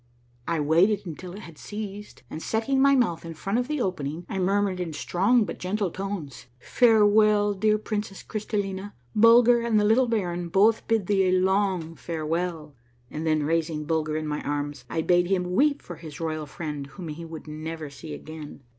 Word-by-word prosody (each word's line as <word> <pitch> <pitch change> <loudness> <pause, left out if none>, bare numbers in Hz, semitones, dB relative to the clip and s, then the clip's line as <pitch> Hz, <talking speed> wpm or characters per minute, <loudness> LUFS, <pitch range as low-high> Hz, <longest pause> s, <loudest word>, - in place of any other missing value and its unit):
I 165 -1 0
waited 180 +8 +3
until 175 +2 -7
it 205 - -8
had 165 -6 -12
ceased, 210 -1 -7
and 155 - -7
setting 230 +8 0
my 275 0 +6
mouth 225 -11 +1
in 165 -1 -7
front 195 +8 -1
of 250 - -2
the 300 0 -2
opening 170 - -3
I 195 - -3
murmured 195 0 +1
in 170 -3 -3
strong 205 +9 +2
but - - -7
gentle 195 0 -1
tones, 190 -10 -6
— - - -36
" 125 - -36 0.2
Farewell, 210 -2 +5
dear 215 +2 +2
Princess 210 -2 -4
Crystallina. 205 -2 -3 0.2
Bulger 235 +2 +6
and 230 -2 +2
the - - +2
little 235 +4 +4
baron 175 -6 -1
both 215 +5 +3
bid 225 -4 +1
thee 195 -1 +2
a - - +3
long 185 -3 +1
farewell! 160 +1 -3 0.2
" 120 0 -36
and 160 +2 -4
then 155 -1 +2
raising 160 0 -1
Bulger 155 -1 0
in 155 - -3
my 150 -1 -3
arms, 145 -2 -3
I 160 - -1
bade 175 +1 +3
him 180 -1 0
weep 285 +7 +2
for 175 - -8
his 155 -3 -10
royal 155 -2 -3
friend 150 -2 -5
whom 160 +5 -8
he 155 +3 -6
would 160 -1 -9
never 155 0 -6
see 150 +1 -8
again. 155 -3 -10
180 Hz, 195 wpm, -26 LUFS, 155-210 Hz, 0.2 s, my